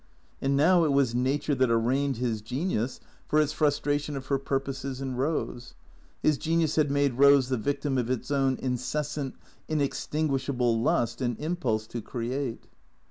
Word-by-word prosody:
And 135 0 +1
now 170 +4 +5
it 155 - +2
was 135 -4 +3
Nature 135 +4 0
that 130 -2 +2
arraigned 130 +4 +1
his 115 -3 -1
genius 125 - -2 0.3
for 155 - +3
its 150 0 +2
frustration 145 -1 0
of 130 - -7
her 140 -1 +2
pur 135 0 0
poses 135 -1 -5
in 135 -1 -3
Eose. 125 -3 -2 0.5
His 150 -2 +3
genius 160 -1 +1
had 150 -2 +3
made 140 -2 +1
Eose 140 -2 +6
the 130 - +1
victim 140 +2 -1
of 120 -1 -2
its 130 +2 -2
own 135 -2 +2
incessant, 135 +3 -2 0.3
inextinguishable 135 -5 0
lust 115 +1 +1
and 120 -3 -1
impulse 150 -10 -1
to 120 +1 -6
create. 120 +2 -4
135 Hz, 160 wpm, -27 LUFS, 125-145 Hz, 0.5 s, Eose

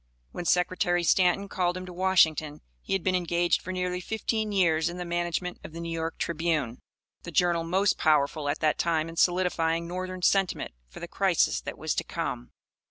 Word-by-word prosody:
When 175 - -6
Secretary 180 0 +1
Stanton 180 +3 +3
called 180 -2 -1
him 185 - -6
to 180 - -9
Washington 160 -5 +2 0.2
he - - -4
had 195 -3 0
been 185 - +1
engaged 175 -1 +1
for 185 - -6
nearly 180 0 -2
fifteen 220 +1 -2
years 170 -5 +2
in 175 - -7
the 180 - -4
management 175 +1 -2
of 155 - -10
the 165 - -7
New 170 0 -5
York 165 0 -3
Tribune, 155 -7 -1 0.4
the - - -8
journal 170 0 +2
most 190 +4 +1
powerful 150 -1 +2
at 145 - -2
that 155 -1 +1
time 165 -1 0
in 165 - -9
solidifying 170 -2 +1
Northern 185 +1 -5
sentiment 195 0 +1 0.2
for - - -11
the - - -5
crisis - - +1
that - - -7
was - - -1
to - - -1
come. - - -4
175 Hz, 190 wpm, -27 LUFS, 165-185 Hz, 0.4 s, Stanton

